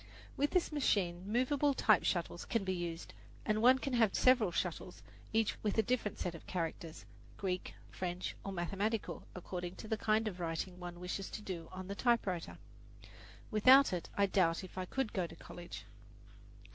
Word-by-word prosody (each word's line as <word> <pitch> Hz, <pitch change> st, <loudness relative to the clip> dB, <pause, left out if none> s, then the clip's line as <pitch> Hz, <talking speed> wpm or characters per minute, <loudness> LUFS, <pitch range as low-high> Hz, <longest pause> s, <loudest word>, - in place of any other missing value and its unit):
With 290 Hz, +1 st, +1 dB
this 365 Hz, -3 st, +1 dB
machine 195 Hz, -, 0 dB
movable 275 Hz, +4 st, +2 dB
type 215 Hz, -4 st, +4 dB
shuttles 175 Hz, -1 st, -1 dB
can 230 Hz, -3 st, 0 dB
be 190 Hz, -1 st, -1 dB
used, 170 Hz, -2 st, -4 dB, 0.3 s
and 215 Hz, 0 st, +1 dB
one 255 Hz, +3 st, +7 dB
can 270 Hz, 0 st, -3 dB
have 225 Hz, -5 st, +3 dB
several 245 Hz, -7 st, +5 dB
shuttles, 170 Hz, -6 st, -3 dB, 0.3 s
each 220 Hz, -1 st, +1 dB
with 210 Hz, 0 st, -1 dB
a 220 Hz, -, +5 dB
different 225 Hz, -3 st, -1 dB
set 175 Hz, -, -2 dB
of 165 Hz, -, -11 dB
characters 165 Hz, -, -4 dB, 0.3 s
Greek, 185 Hz, -2 st, -3 dB, 0.2 s
French, 180 Hz, 0 st, -3 dB
or 195 Hz, -, -4 dB
mathematical, 195 Hz, +5 st, -2 dB
according 180 Hz, 0 st, -5 dB
to -, -, -9 dB
the 220 Hz, -, 0 dB
kind 215 Hz, +1 st, +2 dB
of 185 Hz, -4 st, -4 dB
writing 175 Hz, +2 st, -3 dB
one 175 Hz, -1 st, -7 dB
wishes 180 Hz, +2 st, -4 dB
to 215 Hz, -, -7 dB
do 170 Hz, -5 st, -5 dB
on 185 Hz, 0 st, -7 dB
the 200 Hz, -, -3 dB
typewriter. 200 Hz, -6 st, 0 dB, 0.9 s
Without 255 Hz, +3 st, +7 dB
it, 175 Hz, -, -3 dB
I 200 Hz, -, +5 dB
doubt 185 Hz, -3 st, +2 dB
if 185 Hz, -, -10 dB
I 185 Hz, 0 st, -3 dB
could 265 Hz, +4 st, -2 dB
go 180 Hz, -3 st, 0 dB
to 165 Hz, -, -12 dB
college. 175 Hz, +1 st, -9 dB
190 Hz, 175 wpm, -35 LUFS, 175-225 Hz, 0.9 s, one